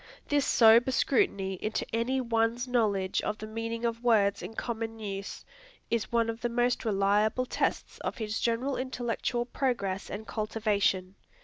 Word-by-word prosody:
This 290 -1 +2
sober 230 +2 +6
scrutiny 195 -7 +1
into 215 - -2
any 240 +4 +1
one's 230 0 0
knowledge 210 -6 +1
of 210 - -2
the 215 - -7
meaning 230 +1 -4
of 230 0 -2
words 205 -4 +3
in 225 - -7
common 225 -1 -4
use, 200 -2 -6 0.5
is 230 -2 -1
one 230 -1 +2
of 230 0 -4
the 240 - 0
most 240 +1 +1
reliable 210 +3 +2
tests - - -2
of - - -4
his 220 -1 -3
general 245 +4 0
intellectual 245 -1 -2
progress 235 -7 -2
and 210 +2 -6
cultivation. 210 -4 0
225 Hz, 150 wpm, -29 LUFS, 210-240 Hz, 0.5 s, sober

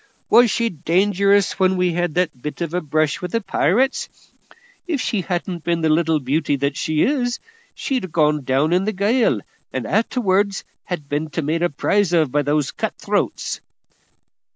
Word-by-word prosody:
Was 240 0 +7
she 230 +3 0
dangerous 195 +4 +2
when 190 0 +3
we 180 -1 +1
had 175 -2 -1
that 165 -8 -1
bit 150 +5 -6
of 170 -1 -3
a 180 - 0
brush 155 -1 0
with 180 -1 -5
the 230 - +2
pirates? 230 - +1 0.8
If 320 -6 -1
she 215 -5 -1
hadn't 175 -1 -3
been 170 -1 0
the 160 - +2
little 160 0 +2
beauty 145 +2 0
that 140 0 -1
she 155 0 0
is, 245 -3 0 0.4
she'd 260 -8 -2
ha' 180 - -11
gone 150 -2 +2
down 135 +5 +1
in 185 +2 +2
the 215 - -1
gale 215 +6 +2 0.3
and - - -3
a'terwards 200 -4 +1 0.3
ha' 180 - +1
been 150 +2 -2
made 160 +3 -1
a 175 - +2
prize 195 +5 +1
of 155 -6 +3
by 145 - +2
the 145 -1 0
cut - - -3
throats." - - -2
175 Hz, 175 wpm, -21 LUFS, 155-200 Hz, 0.8 s, Was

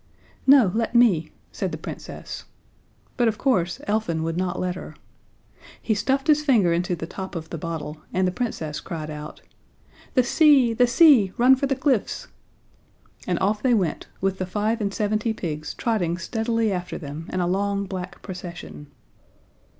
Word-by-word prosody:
"No, 265 -9 +7
let 230 +1 -1
me," 215 -10 +4 0.2
said - - -3
the - - -4
Princess. - - -8 0.7
But 240 -2 +3
of 220 -1 0
course 185 -10 +1
Elfin 205 -7 0
would 165 0 -2
not 180 0 -1
let 180 -1 -1
her. 185 - -9 0.8
He 220 - 0
stuffed 270 +6 0
his 305 -1 +4
finger 220 - +4
into 175 +1 0
the 165 - -5
top 190 +2 -7
of 160 -1 -6
the 165 - -3
bottle, 155 -2 -5
and 185 0 +1
the - - 0
Princess 175 - -3
cried 155 -4 -6
out: 150 0 -8 0.7
"The 255 - +5
sea 270 -3 +5
the 245 +2 +4
sea 245 - +6
run 255 +2 +6
for 275 +1 -1
the 270 - 0
cliffs!" 260 -4 0 1.0
And 180 - +1
off 205 +3 0
they 250 -3 +3
went, 180 -7 -1
with 195 0 0
the 185 - -2
five 215 +4 -1
and 200 -1 0
seventy 215 +2 0
pigs 155 -7 -5
trotting 180 -8 0
steadily 225 +3 -1
after 180 -1 -3
them 150 +1 -7
in 185 - -1
a 175 - +1
long 200 +2 0
black 185 -1 -7
procession. 170 - -8
195 Hz, 170 wpm, -24 LUFS, 175-235 Hz, 1.0 s, No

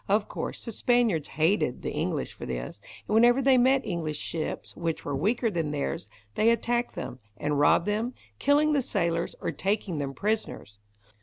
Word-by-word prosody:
Of 205 +1 +2
course - - -5
the 230 - -4
Spaniards 225 - +2
hated 160 -2 +1
the - - -2
English - - -2
for - - -8
this, 60 -1 -5 0.3
and - - -2
whenever 240 +3 +6
they 265 -1 +5
met 260 +2 +4
English 160 -4 -2
ships 160 +1 -4
which 165 -1 -3
were 145 - -2
weaker 220 - +1
than 165 -5 -1
theirs 150 +3 -3 0.2
they 220 +2 +3
attacked 235 +1 0
them, 125 - -6 0.2
and 145 -1 -1
robbed 155 +3 +4
them, 220 +4 -1 0.2
killing 295 +2 +3
the 285 - +3
sailors, 170 -7 -1
or - - -1
taking 195 -4 -1
them 135 -1 -3
prisoners. 210 - -2
200 Hz, 175 wpm, -27 LUFS, 155-240 Hz, 0.3 s, whenever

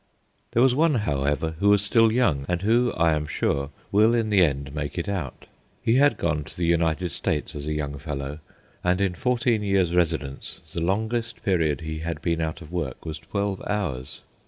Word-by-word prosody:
There 120 - +4
was 130 -1 +5
one, 155 +2 +3
however, 75 - 0
who 100 - +3
was 100 -1 +5
still 115 +2 +5
young, 100 - +2
and 90 +1 -1
who, 120 +3 +3
I 80 -1 +3
am 75 -1 -1
sure, 70 -1 -1 0.2
will 110 +4 +5
in 110 -2 0
the 100 -3 +6
end 70 -3 -1
make 75 +1 -4
it 85 - -2
out. 90 -10 -4 0.3
He 115 +3 +2
had 140 -5 +4
gone 75 -5 0
to - - -14
the 85 - 0
United 85 +1 +1
States 75 +1 -2
as 75 0 -6
a 75 - -1
young 70 -2 -3
fellow, 70 -1 -5 0.4
and 90 +1 +2
in 95 -2 +1
fourteen 120 +2 +1
years' 95 -4 +1
residence 80 -6 -1
the 85 - -2
longest 110 +5 -1
period 80 -7 +1
he 80 0 -5
had 80 -1 -4
been 85 -1 0
out 80 0 -3
of 75 - -13
work 90 -1 -4
was 80 -1 -5
twelve 100 +3 -3
hours. 75 -12 -3
85 Hz, 200 wpm, -25 LUFS, 75-105 Hz, 0.4 s, the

